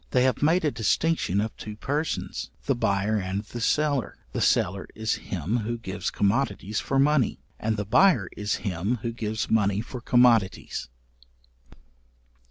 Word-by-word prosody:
They 125 - +3
have 130 0 +1
made 160 +3 +3
a 150 - +2
distinction 115 - +1
of 110 +1 -2
two 105 -1 -7
persons, 145 +8 -3 0.2
the 135 - +2
buyer 110 -2 +1
and 95 +2 -3
the 120 +2 -7
seller: 145 0 +1
the - - -3
seller 95 +2 +2
is 110 0 -1
him 95 +5 -1
who 120 +1 -2
gives 100 -4 -4
commodities 105 -1 0
for 135 - -1
money; 140 -3 +3 0.2
and 110 0 -1
the 105 - -2
buyer 125 - +4
is 105 0 -1
him 100 +5 -1
who 115 - -1
gives 110 -2 -3
money 105 -2 +3
for 120 +2 -6
commodities. 120 - +2
110 Hz, 155 wpm, -26 LUFS, 100-130 Hz, 0.2 s, buyer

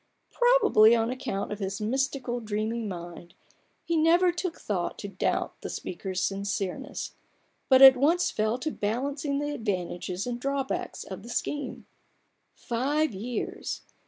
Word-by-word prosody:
Probably 485 - +5
on 230 +1 +1
account 210 -7 -3
of 210 - -4
his 195 -1 -3
mystical, 255 +2 -1
dreaming 220 +1 -2
mind, 175 -2 -8 0.5
he 335 - 0
never 340 +3 +4
took 345 0 -4
thought 185 -5 -2
to 200 - -6
doubt 195 -2 -2
the - - -5
speaker's 185 +1 -4
sincereness, 200 +6 -3 0.6
but 260 0 +7
at 265 -1 +11
once 320 +7 +2
fell 215 +2 0
to 310 +5 -3
balancing 280 +7 -2
the 290 +1 -2
advantages 185 -5 -3
and 245 -1 -4
drawbacks 275 0 -2
of 190 0 -8
the 235 - -11
scheme. 290 +3 -3 0.7
Five 280 +4 0
years 230 +5 -4
240 Hz, 135 wpm, -28 LUFS, 200-280 Hz, 0.7 s, at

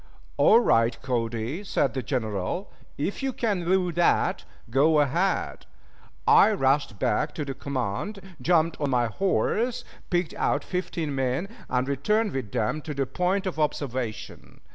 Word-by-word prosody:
"All 225 - +6
right, 115 - +2
Cody," 120 - -2
said 140 - 0
the 130 - -2
General. 110 - -3 0.3
"If 170 - -2
you 270 0 0
can 210 -7 -1
do 180 0 +2
that, 170 +1 +2 0.3
go 150 +5 +4
ahead." 170 +7 0 0.6
I - - +6
rushed 135 -4 +1
back 145 +10 0
to 150 - -3
the 135 - -4
command, 135 - -3 0.2
jumped 165 -2 +2
on 145 - +1
my 125 -2 +2
horse, 220 - 0 0.2
picked 175 -2 0
out 145 - 0
fifteen 170 -5 -3
men, 135 +6 -1 0.2
and 125 +1 0
returned 210 - +1
with 130 -7 -4
them 125 +5 -1
to 150 0 -6
the 135 0 0
point 185 +7 0
of 180 -4 -3
observation. 130 -7 -3
145 Hz, 145 wpm, -26 LUFS, 125-180 Hz, 0.6 s, All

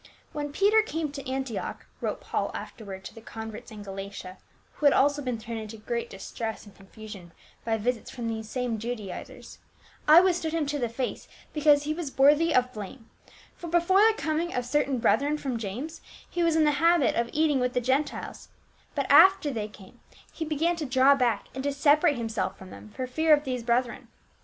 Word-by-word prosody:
"When 290 -1 -4
Peter 410 +7 +4
came 320 -8 -3
to 275 -2 -7
Antioch,"t 265 -3 -4 0.2
wrote - - -2
Paul - - -2
after 225 - -8
ward 190 -2 -8
to - - -9
the 225 - -12
converts 220 -1 -8
in 210 -2 -9
Galatia 195 -1 -8 0.2
— - - -36
who 295 - +2
had 280 - +6
also 290 +1 +3
been 250 -4 -2
thrown 225 +1 -6
into 220 0 -8
great 235 +2 -4
distress 220 +4 -6
and 205 - -15
confusion 195 -3 -12 0.3
by 225 -1 0
visits 235 +1 -2
from 240 -2 -5
these 220 -1 -4
same 245 -2 -2
Judaisers, 220 -5 -7 0.2
" - - -26
I 310 +3 +10
withstood 350 -3 +1
him 325 -2 0
to 290 +1 -2
the 240 -3 -1
face, 245 +3 -4 0.3
because 295 -1 +4
he 305 +1 -1
was 315 -4 -6
worthy 295 +5 +5
of 255 0 +2
blame; 220 +3 -9 0.4
for 345 - -8
before 345 +3 +3
the 440 0 +5
commg 315 +1 -1
of 250 - -1
certain 275 0 +1
brethren 280 +5 +2
from 265 -5 -3
James, 245 +10 -6 0.3
he 350 - -3
was 335 -1 +3
in 320 - +4
the 295 -1 +2
habit 335 -5 +4
of 235 0 0
eating 300 -3 +2
with 250 0 0
the - - +2
Gentiles, 265 +4 -2 0.5
but - - 0
after 380 -6 +7
they 220 -4 -3
came, 210 +2 -16 0.3
he 325 - -4
began 320 +3 0
to 315 - -3
draw 260 +2 +5
back 250 -4 +1
and 265 - -5
to 285 - 0
separate 290 +1 +3
himself 225 -4 -2
from 190 -1 -12
them - - -11
for 255 +5 -5
fear 310 +5 +4
of 290 - -5
these 255 -3 -3
brethren. 240 +1 -1
260 Hz, 205 wpm, -27 LUFS, 225-300 Hz, 0.5 s, I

